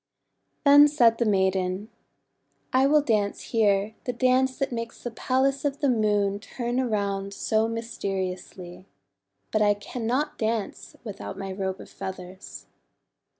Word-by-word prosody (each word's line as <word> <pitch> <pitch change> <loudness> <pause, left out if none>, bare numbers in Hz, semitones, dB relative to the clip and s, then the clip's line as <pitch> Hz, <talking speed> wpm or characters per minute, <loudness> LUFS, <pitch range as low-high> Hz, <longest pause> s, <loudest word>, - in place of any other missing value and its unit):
Then 290 +1 +9
said 240 -6 +3
the 235 - +2
maiden: 190 0 0 0.8
:'I 260 +1 +5
will 300 +1 +5
dance 210 -6 0
here 205 -1 +2
the 250 - -1
dance 255 +2 +2
that 275 -1 -1
makes 230 -1 -5
the 240 - -4
Palace 265 +4 0
of 285 -1 -1
the 285 -3 +2
Moon 205 -4 +1
turn 240 +3 -3
around 200 -5 -1
so 220 0 +1
mysteriously. 190 -5 -5 0.6
But 215 - +1
I 205 -1 +4
cannot 245 +7 -3
dance 220 -2 -3
without 205 -4 -7
my 195 0 -5
Robe 190 0 -3
of - - -11
Feathers." 185 0 -8
220 Hz, 135 wpm, -26 LUFS, 195-255 Hz, 0.8 s, Then